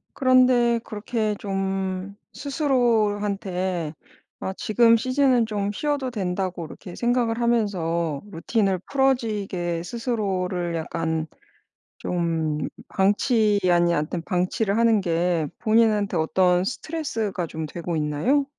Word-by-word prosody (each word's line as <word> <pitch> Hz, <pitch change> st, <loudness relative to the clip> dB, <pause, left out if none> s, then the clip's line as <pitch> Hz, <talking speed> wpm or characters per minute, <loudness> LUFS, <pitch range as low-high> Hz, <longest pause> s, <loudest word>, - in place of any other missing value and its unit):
그런데 255 Hz, -3 st, +4 dB
그렇게 215 Hz, 0 st, -2 dB
좀 195 Hz, 0 st, -3 dB, 0.2 s
스스로한테 205 Hz, -, 0 dB, 0.5 s
아 190 Hz, -, -3 dB
지금 230 Hz, +1 st, +4 dB
시즌은 255 Hz, -1 st, +2 dB
좀 205 Hz, -2 st, -2 dB
쉬어도 285 Hz, +2 st, -1 dB
된다고 185 Hz, -4 st, -3 dB
그렇게 180 Hz, +3 st, -10 dB
생각을 240 Hz, -1 st, +1 dB
하면서 170 Hz, -10 st, 0 dB
루틴을 190 Hz, +2 st, 0 dB
풀어지게 210 Hz, -11 st, 0 dB
스스로를 190 Hz, -7 st, -2 dB
약간 160 Hz, 0 st, -2 dB, 0.7 s
좀 165 Hz, -3 st, -1 dB, 0.3 s
방치 210 Hz, +2 st, +2 dB
아니 175 Hz, 0 st, +3 dB
아무튼 160 Hz, +3 st, -2 dB
방치를 190 Hz, +4 st, 0 dB
하는 230 Hz, -2 st, +4 dB
게 170 Hz, -2 st, 0 dB
본인한테 215 Hz, -4 st, +2 dB
어떤 180 Hz, +2 st, +3 dB
스트레스가 225 Hz, -, -3 dB
좀 160 Hz, 0 st, -5 dB
되고 170 Hz, +1 st, -4 dB
있나요? 155 Hz, -, +1 dB
200 Hz, 250 characters per minute, -24 LUFS, 175-235 Hz, 0.7 s, 그런데